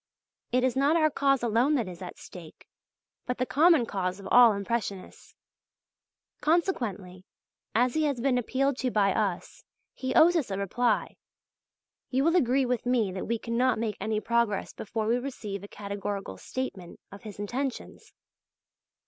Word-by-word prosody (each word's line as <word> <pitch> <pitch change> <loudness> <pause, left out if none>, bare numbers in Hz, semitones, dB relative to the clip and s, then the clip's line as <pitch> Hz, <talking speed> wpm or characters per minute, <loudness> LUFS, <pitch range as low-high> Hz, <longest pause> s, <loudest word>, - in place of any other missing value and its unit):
It 250 0 +2
is 260 -1 +1
not 280 +4 +3
our 310 -2 +3
cause 275 -2 +1
alone 240 +6 +2
that 235 -7 0
is 180 0 -9
at 180 - -8
stake, 170 -4 -12 0.6
but 250 - -2
the 255 - 0
common 310 -1 +4
cause 185 -3 -3
of 195 - -9
all 240 -3 +8
Impressionists. 200 -1 -5 1.1
Consequently, 220 - -1 0.5
as 245 +2 +3
he 315 -1 +1
has 280 -4 -1
been 250 0 +2
appealed 265 +2 0
to 260 - -1
by 200 -4 +2
us, 195 -5 -3 0.3
he 260 -1 -4
owes 340 +2 +6
us 305 -9 0
a 195 - -3
reply. 220 +4 0 0.9
You 265 +1 +1
will 330 +3 +3
agree 265 -4 +3
with 245 -1 -2
me 235 -6 +2
that 185 0 -5
we 230 - 0
cannot 245 +3 0
make 220 -1 -2
any 215 -1 -1
progress 235 -3 0
before 220 +1 -4
we 235 +3 +2
receive 215 -7 -6
a - - -8
categorical 200 - -5
statement 200 -9 -6
of 200 - -11
his 210 -3 -9
intentions. 250 +6 -5
235 Hz, 160 wpm, -28 LUFS, 200-260 Hz, 1.1 s, all